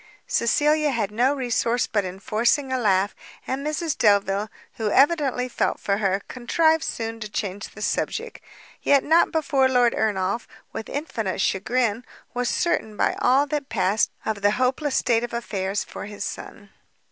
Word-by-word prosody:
Cecilia 300 +5 +2
had 225 -6 -1
no 250 +6 +2
resource 240 -2 0
but 205 -2 0
in 185 0 -6
forcing 240 +7 +1
a 260 - 0
laugh, 200 -3 +2 0.3
and 265 +2 -3
Mrs 305 +1 -1
Delvile, 200 0 +2 0.3
who 220 -2 -1
evidently 275 -2 +3
felt 250 - -1
for 200 0 0
her, 195 -1 0
contrived 320 +6 +2
soon 225 -6 -4
to 215 -2 -6
change 200 -1 -4
the 210 - -9
subject; - - -2 0.4
yet 280 -1 +4
not 325 +3 +4
before 280 -4 +2
Lord 245 -2 +3
Ernolf, 205 +1 -1 0.3
with 220 - -6
infinite 225 - -3
chagrin, 225 +4 0 0.3
was 245 0 -1
certain 220 -11 -1
by - - +1
all 265 +3 +4
that 290 -1 -3
passed 200 0 +1 0.2
of 215 -2 -2
the 205 - +4
hopeless 260 +3 0
state 235 -1 +2
of 240 - -5
affairs 200 -4 -2
for - - -8
his 205 0 -6
son. 205 -2 -8
235 Hz, 160 wpm, -24 LUFS, 205-270 Hz, 0.4 s, yet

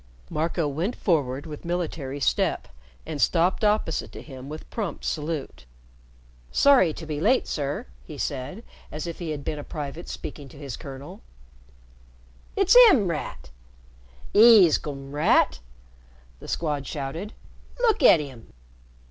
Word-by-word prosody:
Marco 165 0 -1
went 165 - -2
forward 145 -6 0
with 150 -2 -8
military 165 -5 -3
step 135 - 0 0.4
and 155 -3 -4
stopped 175 +5 +2
opposite 210 -7 +1
to - - -10
him 135 -2 -10
with 155 +1 -8
prompt 210 -6 -4
salute. 150 - -4 0.9
"Sorry 265 - +5
to 160 - -8
be 150 -2 -4
late, 245 +8 +3
sir," 145 -1 -3 0.2
he - - -10
said, 140 - -4 0.3
as 150 +2 -5
if 170 -1 -6
he 170 -3 -4
had 150 -2 -4
been 150 +1 -3
a - - -6
private 150 +3 -6
speaking 140 -2 -7
to 140 - -15
his 140 -4 -6
colonel. 140 -1 -10 1.3
"It's 390 +2 +4
'im, 215 - +3
Rat! 150 - -5 0.8
'E's 210 -7 +7
come, 135 -2 -7
Rat!" 145 - +3 0.8
the - - -11
Squad 145 -4 -2
shouted. 160 +8 -5 0.5
"Look 465 -3 +3
at 170 - +7
'im!" 135 -6 -9
155 Hz, 140 wpm, -25 LUFS, 140-175 Hz, 1.3 s, E's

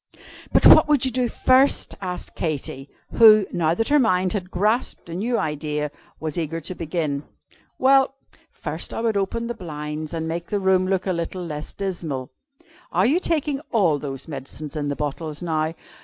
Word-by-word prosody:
"But - - +3
what - - +9
would 290 -4 +3
you 260 - +1
do 250 0 0
first?" 260 +4 +3
asked 180 -2 -5
Katy; 140 -3 -4 0.2
who, 215 -3 +7
now 165 -1 +1
that 225 +6 -1
her 295 0 +5
mind 185 -7 +2
had 185 -4 -3
grasped 210 +6 0
a - - -6
new 230 +7 -1
idea, 150 -1 -2 0.3
was 155 +1 -3
eager 165 0 -3
to 165 +3 -5
begin. 155 -4 -2 0.6
"Well 270 +1 +4 0.3
first - - -5
I - - -2
would 225 -2 +1
open 200 +4 -1
the 240 - -3
blinds, 155 -5 -6
and 160 0 -3
make 170 +1 -4
the 205 - -1
room 190 -1 +2
look 190 -1 0
a 190 - 0
little 175 +1 -4
less 150 -2 -6
dismal. 165 -9 -4 0.6
Are 185 +3 +2
you 295 +9 +3
taking 300 -5 -1
all 175 - +3
those 135 -2 -5
medicines 145 +1 -7
in 145 -1 -2
the 145 - -1
bottles 150 +2 -4
now?" 160 -1 -1
175 Hz, 180 wpm, -23 LUFS, 155-220 Hz, 0.6 s, what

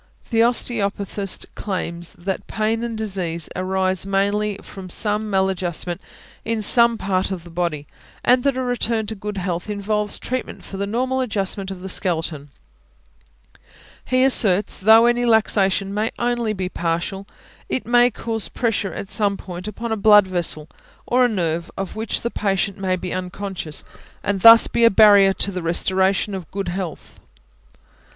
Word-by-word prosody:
The 225 - +1
osteopathist 205 -4 0
claims 175 -4 -3
that 190 +2 -5
pain 220 +1 -1
and 230 -2 -4
disease 185 -6 -3
arise 185 0 0
mainly 200 +1 0
from 190 -2 -10
some 210 +3 0
mal 190 -1 +2
adjustment 175 -1 -2 0.4
in 225 -1 -2
some 235 +1 +5
part 190 -2 -1
of 185 -3 -5
the 170 - -13
body, 165 -4 -2 0.4
and 250 0 +4
that 275 -2 +1
a 260 - -1
return 235 -3 -1
to 220 - -4
good 210 0 -6
health 180 +1 -3
involves 210 0 -2
treatment 255 0 -5
for 195 - -8
the 200 +1 -2
normal 255 +5 -1
adjustment 195 -4 -2
of 190 -2 -7
the 190 - -6
skeleton; 165 -6 -2 1.5
he 255 0 +2
asserts, 210 -7 +3
though 220 +3 +6
any 240 0 +2
luxation 205 -4 +2
may 210 +2 -1
be - - -19
only 235 -2 -1
partial, 175 +3 -3 0.4
it 260 - -2
may 240 +1 +4
cause 225 -1 -3
pressure 210 -6 -1
at 195 - -6
some 200 -2 +1
point 180 +1 -8
upon 225 +2 -5
a - - +1
blood 210 -1 +6
vessel, 175 -4 -2 0.4
or 250 +1 +3
a - - +2
nerve 170 -5 -1
of 195 0 -5
which 220 +1 -3
the 235 - -3
patient 195 -1 -1
may 185 -1 0
be 180 0 -5
unconscious, 185 -3 -5 0.4
and 200 -2 -1
thus 230 +2 +9
be 235 - +1
a 230 - +8
barrier 200 -2 +6
to 195 +1 -1
the 180 -1 -4
restoration 190 +4 +1
of 185 -5 -6
good 195 -2 -4
health. 180 -2 -6
200 Hz, 160 wpm, -21 LUFS, 185-225 Hz, 1.5 s, thus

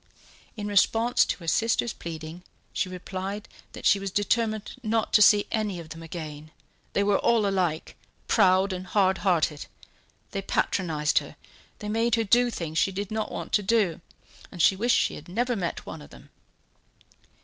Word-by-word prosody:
In 210 - -4
response 225 +4 +3
to - - -2
her 165 - -9
sister's 230 +4 +1
pleading 160 +1 -8 0.3
she 185 - -1
replied 190 +3 -5 0.3
that - - -9
she 200 - +5
was 195 0 -4
determined 215 +2 0
not 225 -1 -1
to 210 - +6
see 205 -1 +6
any 210 -5 -1
of 165 -2 -10
them 165 +1 -9
again, 155 -2 -8 0.4
they 200 - +2
were 200 -1 +2
all 230 -3 +3
alike, 180 -5 -1 0.3
proud 190 -2 +4
and 185 0 -6
hard 190 -1 +2
hearted; 165 -6 0 0.6
they 195 - -3
patronized 165 -5 +1
her, - - -11 0.4
they 210 - -7
made 225 +2 +1
her 225 - +1
do 240 +4 +4
things 160 -7 -3
she 195 - +2
did 200 +2 -5
not 220 0 -2
want - - -6
to 210 - +4
do, 195 -5 +1 0.5
and 175 - -10
she 180 +4 +5
wished 235 +5 +2
she - - +1
had 155 - -10
never 240 +6 0
met 180 -5 -4
one - - -8
of 70 - -13
them. - - -16
195 Hz, 175 wpm, -26 LUFS, 175-215 Hz, 0.6 s, to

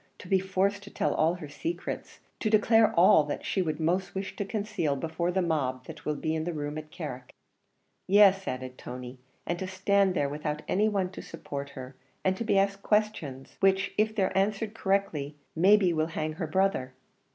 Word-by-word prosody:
to - - -11
be 190 +1 +3
forced 195 +1 0
to 200 - -11
tell - - 0
all 160 +3 +2
her 160 -4 -8
secrets, 325 - -5 0.2
to 215 - 0
declare 220 +1 +5
all 170 -3 +7
that 145 - -5
she 190 - 0
would 155 -3 -2
most 180 +5 0
wish 195 0 -4
to - - -2
conceal 200 -7 -1
before 160 +4 -2
the 190 0 +1
mob 130 -6 -1
that - - -10
will 150 - 0
be 155 +2 -2
in 160 -1 -1
the 175 +1 -3
room 145 -1 -4
at 155 0 -7
Carrick." 145 -7 -7 0.7
"Yes," 195 -1 +6
added 130 0 -5
Tony, 125 0 -8 0.3
"and 175 0 -2
to 190 - -3
stand 190 0 +2
there 145 - +1
without 150 +1 -4
any 210 +3 +2
one 190 -3 -1
to - - -8
support 140 -3 -6
her, 130 0 -8 0.3
and 190 0 +3
to 210 - -3
be 215 - +2
asked 195 0 +1
questions, 195 -13 -1
which 195 0 +2
if 215 +1 +1
they're 195 -3 0
answered 205 +2 0
correctly, 190 -9 -1 0.2
may 190 +6 +6
be 185 -4 +2
will 155 0 +1
hang 155 -1 -3
her 165 0 -4
brother." 155 -7 0
180 Hz, 200 wpm, -28 LUFS, 150-200 Hz, 0.7 s, all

